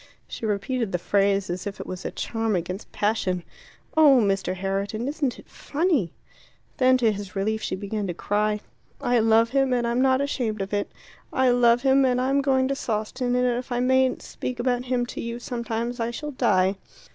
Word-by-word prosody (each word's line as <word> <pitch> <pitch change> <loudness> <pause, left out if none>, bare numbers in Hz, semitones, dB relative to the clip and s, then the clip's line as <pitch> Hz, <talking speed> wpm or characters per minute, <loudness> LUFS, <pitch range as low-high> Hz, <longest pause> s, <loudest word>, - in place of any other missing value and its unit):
She 225 - -5
repeated 215 +2 -1
the 175 - +1
phrase 195 +2 +1
as 175 +3 -4
if 200 - -6
it - - -5
was 185 0 -7
a - - -1
charm 225 -2 -2
against 180 +3 -4
passion. 195 -4 0 0.5
"Oh, 295 -5 +7
Mr. 195 -3 0
Herriton, 195 +5 -2
isn't 285 -3 -1
it - - -15
funny!" 290 - -1 0.7
Then, 255 0 +5
to 230 -3 +3
his 200 -2 -7
relief, 215 +3 -1
she - - -2
began 205 +1 -3
to 175 - -4
cry. 210 +2 0 0.4
"I 245 -1 +2
love 225 +1 +4
him, 270 -1 +2
and 240 -1 +1
I'm 235 +2 +1
not 260 0 +4
ashamed 245 -6 -1
of 195 - -8
it. 205 0 -1 0.4
I 260 -1 +3
love 245 0 +4
him, 270 0 +4
and 250 -1 +2
I'm 270 +2 +2
going 265 -1 +2
to 275 - 0
Sawston, 245 +2 -2
and 250 0 +2
if 245 +1 -1
I 245 - 0
mayn't 260 +1 +2
speak 250 -1 -5
about 245 0 0
him 245 -1 0
to - - -6
you 235 0 -4
sometimes, 235 0 -4
I 230 0 0
shall 295 +5 -5
die." 190 -6 +2
235 Hz, 195 wpm, -25 LUFS, 205-255 Hz, 0.7 s, Oh